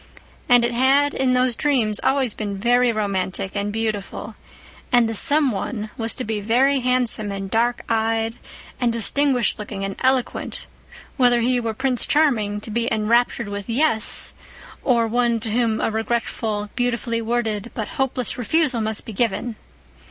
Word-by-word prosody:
And 245 -1 +6
it 240 - 0
had, 270 +4 +3
in 260 -1 +1
those 250 -1 +2
dreams, 240 -8 +1
always 265 -5 +1
been 205 -2 -4
very 245 +3 +3
romantic 195 -2 -2
and 205 0 -1
beautiful: 215 0 -3 0.6
and 240 -2 +4
the 225 - -3
"some 285 +5 +3
one" 215 +1 -4
was 225 -1 0
to 255 - -4
be 215 -2 -2
very 260 +6 +3
handsome 245 -4 0
and 195 -1 -5
dark 235 +2 +1
eyed 225 0 0 0.4
and 245 -2 +1
distinguished 245 +2 +2
looking 200 -2 -5
and 195 0 -4
eloquent, 260 -1 0 0.5
whether 245 -2 +4
he 250 +1 +2
were 225 -2 -3
Prince 260 0 0
Charming 225 -9 +2
to 220 - -8
be 235 +2 -1
enraptured 230 +1 +1
with 205 +2 -6
"yes," 230 -3 +1 0.5
or 235 -3 +3
one 235 0 +1
to 225 -1 -3
whom 230 -1 +1
a - - 0
regretful, 220 -2 -2
beautifully 235 -1 -1
worded, 225 -2 -2
but 220 - -4
hopeless 255 -2 -1
refusal 260 0 +1
must 215 0 -2
be 225 - -7
given. 230 +2 -1
230 Hz, 160 wpm, -22 LUFS, 215-250 Hz, 0.6 s, And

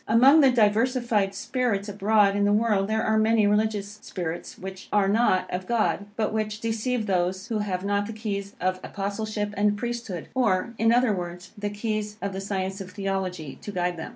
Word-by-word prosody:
Among 265 +8 +7
the 270 - +6
diversified 225 -2 +2
spirits 235 -3 -1
abroad 205 0 +3
in 205 - +1
the 205 - +3
world 210 -2 +2
here 220 0 +1
are 220 0 +2
many 220 0 +3
religious 210 0 0
spirits, 175 -2 -5
which 190 0 -8
are 205 -2 +3
not 200 -3 +3
of 185 +1 -3
God, 220 -3 0
but 215 -1 -1
which 215 -1 -2
deceive 225 +1 -1
those 190 +2 -1
who 220 -2 0
have 195 -2 -2
not 205 0 0
the - - -5
keys 200 -2 -4
of 185 0 0
Apostleship 205 +1 -3
and 205 +1 +2
Priesthood, 235 -7 -4
or, 235 -3 +1
in 225 0 +4
other 240 -2 +4
words, 180 -1 -6
the 205 0 -3
keys 210 0 -3
of 200 -1 -3
the 190 - -4
science 195 0 -3
of 185 - -7
Theology 185 -6 -4
to 205 - -6
guide 180 -2 -1
them. 160 - -6
205 Hz, 190 wpm, -26 LUFS, 195-220 Hz, -, Among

